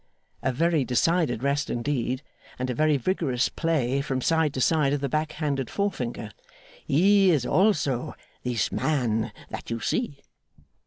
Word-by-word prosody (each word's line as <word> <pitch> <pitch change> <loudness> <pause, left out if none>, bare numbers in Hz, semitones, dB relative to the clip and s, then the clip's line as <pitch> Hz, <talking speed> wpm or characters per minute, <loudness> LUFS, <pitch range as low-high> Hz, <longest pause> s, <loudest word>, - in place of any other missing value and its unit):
a 130 +2 +1
very 160 +3 +2
decided 130 0 +1
rest 140 +2 0
indeed, 130 +1 -1 0.3
and 125 0 -2
a - - -1
very 155 +2 +2
vigorous 135 -4 0
play 140 -5 0
from 135 -2 -2
side 160 +2 +2
to 135 - -4
side 145 0 +3
of 145 - 0
the 140 - -1
back 155 +3 -1
handed 140 -5 -2
forefinger 125 - -3 0.6
'he 195 +6 +5
is 145 -8 +2
also 145 - +1 0.3
this 120 -4 -1
man 120 -8 0 0.2
that - - -6
you 115 0 -2
see. 140 - -2
140 Hz, 150 wpm, -26 LUFS, 125-160 Hz, 0.6 s, he